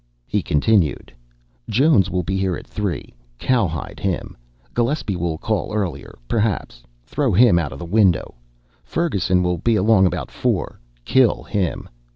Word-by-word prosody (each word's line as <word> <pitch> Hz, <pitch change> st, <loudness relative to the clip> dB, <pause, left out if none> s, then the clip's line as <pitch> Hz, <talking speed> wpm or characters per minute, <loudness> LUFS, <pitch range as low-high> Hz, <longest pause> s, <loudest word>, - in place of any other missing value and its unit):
He -, -, -1 dB
continued, 80 Hz, +1 st, +1 dB, 0.6 s
"Jones 120 Hz, -, +4 dB
will 90 Hz, 0 st, -1 dB
be 95 Hz, +4 st, -2 dB
here 95 Hz, -2 st, 0 dB
at -, -, -11 dB
three 100 Hz, -10 st, -4 dB, 0.2 s
cowhide 95 Hz, -, -1 dB
him. -, -, -3 dB, 0.4 s
Gillespie 120 Hz, -4 st, 0 dB
will 85 Hz, -2 st, -2 dB
call 110 Hz, +4 st, -2 dB
earlier, 100 Hz, -5 st, -3 dB
perhaps 105 Hz, -, -1 dB, 0.2 s
throw 135 Hz, -, 0 dB
him 100 Hz, -2 st, +5 dB
out 75 Hz, -5 st, -3 dB
of -, -, -8 dB
the 85 Hz, -, -7 dB
window. 95 Hz, -1 st, +2 dB, 0.5 s
Ferguson 95 Hz, -, 0 dB
will 90 Hz, -1 st, 0 dB
be 115 Hz, +5 st, +2 dB
along 105 Hz, -1 st, +4 dB
about -, -, -4 dB
four -, -, -2 dB, 0.3 s
kill 130 Hz, -4 st, +3 dB
him. 95 Hz, -9 st, -2 dB
95 Hz, 145 wpm, -21 LUFS, 85-115 Hz, 0.6 s, him